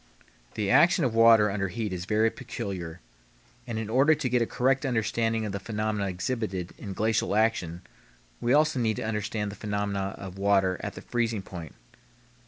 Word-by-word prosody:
The 100 -2 0
action 175 -2 +5
of 120 - 0
water 115 -2 +6
under 100 -1 -1
heat 105 0 -3
is 90 -1 -4
very 110 +2 +2
peculiar, 90 -3 -6 0.7
and 115 -2 -3
in 110 -1 -3
order 135 +7 +4
to 130 - -2
get 125 0 +2
a 115 - +1
correct 135 +2 +1
understanding 115 -3 0
of 105 - -3
the 100 - -3
phenomena 105 -1 -2
exhibited 95 -2 -3
in 100 -3 -6
glacial 110 0 0
action 95 -6 0 0.6
we 120 - 0
also 150 -1 +3
need 110 -2 +1
to - - -4
understand 105 -1 -2
the - - -9
phenomena 100 -2 -2
of 95 -1 -8
water 95 -2 +2
at - - -4
the - - -9
freezing 115 -4 -1
point. 85 -6 -9
105 Hz, 180 wpm, -27 LUFS, 100-115 Hz, 0.7 s, water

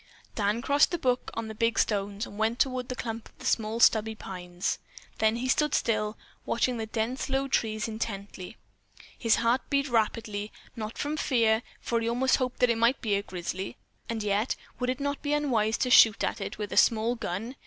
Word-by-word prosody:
Dan 210 +2 0
crossed 285 +1 +4
the 345 - -1
brook 250 -5 0
on 225 0 -3
the 220 - -6
big 230 +1 0
stones 205 0 0
and - - -11
went 225 +2 +1
toward 255 -1 0
the 255 - -3
clump 225 -2 -5
of 255 - -10
small 225 -2 0
stubby 220 -1 +4
pines. 180 -3 -4 0.4
Then 220 0 +3
he 245 +2 -2
stood 300 +3 +2
still, 215 -2 0 0.3
watching 245 +1 0
the 220 -1 -4
dense 230 +5 -2
low 270 +1 0
trees 215 -4 0
intently. 205 -3 -5 0.6
His 230 -2 +3
heart 235 +3 +2
beat 280 0 +1
rapidly, 215 -3 -1 0.2
not 220 -1 -6
from 295 +1 -2
fear, 230 -6 +2 0.2
for 235 - 0
he 230 - 0
almost 255 +3 +2
hoped 255 -1 -3
that 250 -1 +5
it 230 - -1
might 235 +3 +3
be 215 -3 -1
a 200 - +2
grizzly, 185 0 -5 0.3
and 225 -2 -2
yet, 210 +3 +1 0.2
would 250 0 -1
it 255 +2 -1
not 285 0 -2
be 290 0 -1
unwise 235 -7 +1
to 250 - 0
shoot 225 -2 +7
at - - -1
it 195 - -5
with 210 -1 -4
a - - -3
small 230 0 +4
gun? 230 +2 -4
230 Hz, 200 wpm, -28 LUFS, 215-250 Hz, 0.6 s, shoot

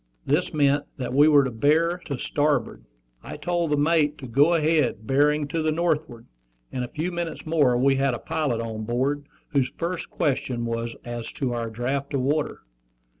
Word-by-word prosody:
This 150 +6 +1
meant 145 -1 +2
that 125 -2 -4
we 145 +3 +6
were 145 -2 +6
to 130 - -2
bear 160 +9 +2
to 140 - -3
starboard. 145 - -1 0.4
I - - -8
told 175 -2 -1
the 150 - +2
mate 150 0 +2
to 135 - -9
go 145 +8 +4
ahead, 155 -9 +1
bearing 145 +3 +2
to 165 +1 -1
the 155 0 +1
northward. 155 -8 -1 0.5
In 125 - -3
a 125 - -2
few 160 +8 -3
minutes 170 -1 -4
more 145 -6 +3
we 135 +2 +3
had 135 -2 +1
a - - -4
pilot 130 -3 -1
on 110 -1 -5
board, 135 +6 -1 0.2
whose 135 -4 +1
first 175 +1 -3
question 125 -4 -1
was 115 0 -3
as 120 -1 -5
to 130 -3 -2
our 115 -1 -3
draft 130 +5 -3
of 135 - +1
water. 145 +3 -1
140 Hz, 185 wpm, -25 LUFS, 125-155 Hz, 0.5 s, we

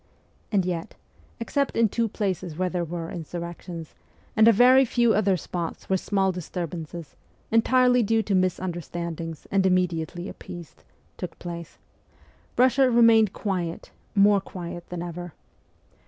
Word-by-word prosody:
And 195 -4 +2
yet 175 -2 -3 0.4
except 280 +4 -1
in 230 -1 +5
two 230 +3 0
places 185 -6 -3
where 185 0 0
there 180 -1 -1
were 170 0 -5
insurrections, 170 0 -7 0.4
and 220 0 +6
a - - +9
very 250 +4 +6
few 240 -2 +2
other 195 -2 +2
spots 170 +2 -5
where - - +5
small 195 0 +1
disturbances, 170 -2 -6 0.4
entirely 250 +2 +4
due 225 0 +2
to 205 - -2
misunderstandings 170 -3 -2
and 195 -1 +3
immediately 180 -1 0
appeased, 175 -4 -10 0.3
took 180 -3 -6
place 170 -1 -7 0.8
Russia 255 +1 +5
remained 230 -3 +5
quiet, 180 -6 -3 0.2
more 200 0 +5
quiet 175 -2 -8
than 175 -1 -4
ever. 175 -1 -7
185 Hz, 130 wpm, -25 LUFS, 170-220 Hz, 0.8 s, a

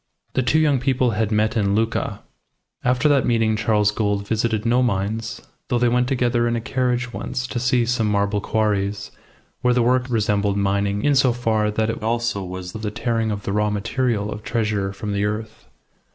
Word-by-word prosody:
The 130 - +1
two 130 +5 +2
young 150 -4 +3
people 125 -1 +1
had 110 0 -1
met 110 +2 +1
in 100 -3 +1
Lucca. 115 +1 -1 0.6
After 125 +4 +2
that 140 -3 +4
meeting 115 -2 +2
Charles 105 -1 +2
Gould 105 -1 -1
visited 110 0 0
no 120 +2 +3
mines, 110 +1 -1 0.3
though 120 - +1
they 120 0 +3
went 125 +1 +2
together 120 -2 +1
in 120 - 0
a - - 0
carriage, 125 0 -1
once, 125 - -3
to 125 - -3
see 125 0 +2
some 115 -2 0
marble 100 0 +1
quarries, 105 -2 -1 0.5
where 125 0 +3
the 125 - +3
work 125 +1 +2
resembled 105 -3 +1
mining 100 0 0
in 145 - +3
so 130 -3 +4
far 110 -3 0
that 110 +1 0
it 115 - -7
also 115 -2 -1
was 90 0 -6
the 110 +1 -4
tearing 115 0 -1
of 105 -1 -3
the 100 - -3
raw 105 0 +1
material 105 0 -1
of 105 - -6
treasure 105 -4 -1
from 100 +1 -5
the 100 0 0
earth. 105 +1 -4
110 Hz, 195 wpm, -22 LUFS, 105-120 Hz, 0.6 s, that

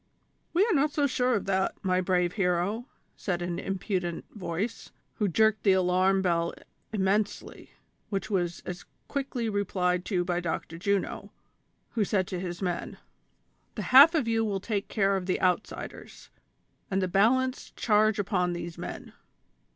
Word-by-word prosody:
"We 365 +5 +4
are 455 - +1
not 295 -1 +3
so 290 -1 +1
sure 250 -2 +1
of 205 - -2
that, 190 -1 0
my 185 -1 +2
brave 180 -1 +1
hero," 195 +5 0 0.3
said 175 -3 -2
an 175 -1 -3
impudent 185 -3 -3
voice, 195 +3 -4 0.3
who 210 - +1
jerked 220 +4 +3
the 195 - +4
alarm 185 +1 +3
bell 170 -2 +1 0.4
immensely, 205 0 -1 0.4
which 195 0 -2
was 175 -5 -1
as 180 0 -6 0.2
quickly 270 -4 -2
replied 180 -4 0
to 180 -4 0
by 175 -1 0
Dr. 165 -1 -4
Juno, 200 +1 -1 0.6
who 225 - +1
said 195 -2 +1
to 180 - -3
his 175 0 -5
men: 175 -2 -3 0.4
" - - -43
The - - -3
half 290 +6 +10
of 290 -7 +1
you 225 -1 +2
will 200 -3 -1
take 200 0 -2
care 195 -2 +1
of 185 -1 -3
the 185 - 0
outsiders, 185 +3 -3 0.6
and 195 - +1
the 185 - +1
balance 250 +8 +2
charge 215 -1 +3
upon 180 -3 0
these 175 -1 -6
men - - -7
195 Hz, 160 wpm, -28 LUFS, 180-220 Hz, 0.6 s, half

